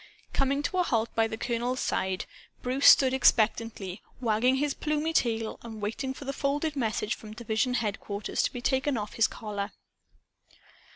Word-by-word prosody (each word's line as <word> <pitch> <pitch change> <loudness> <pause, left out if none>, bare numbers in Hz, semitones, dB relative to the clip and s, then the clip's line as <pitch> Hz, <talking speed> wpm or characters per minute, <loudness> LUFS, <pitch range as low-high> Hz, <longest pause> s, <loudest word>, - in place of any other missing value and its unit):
Coming 275 +1 +1
to 370 - -1
a - - +6
halt 230 -8 0
by 225 0 +2
the 220 - -5
colonel's 245 +2 -1
side, 190 -1 -1 0.4
Bruce 255 +3 +2
stood 260 -2 +8
expectantly 220 -5 +2 0.2
wagging 245 +2 +2
his 285 +1 0
plumy 305 +1 -1
tail 225 -5 0
and 225 -2 -8
waiting 225 +6 -3
for 270 +2 -8
the 275 - -2
folded 290 +2 -1
message 220 -4 -1
from 215 -1 -9
division 235 +2 0
headquarters 205 -2 -2
to - - 0
be 245 - -6
taken 265 +1 +1
off 210 -1 -4
his 225 - +3
collar. 205 -2 -5
235 Hz, 165 wpm, -28 LUFS, 220-270 Hz, 0.4 s, stood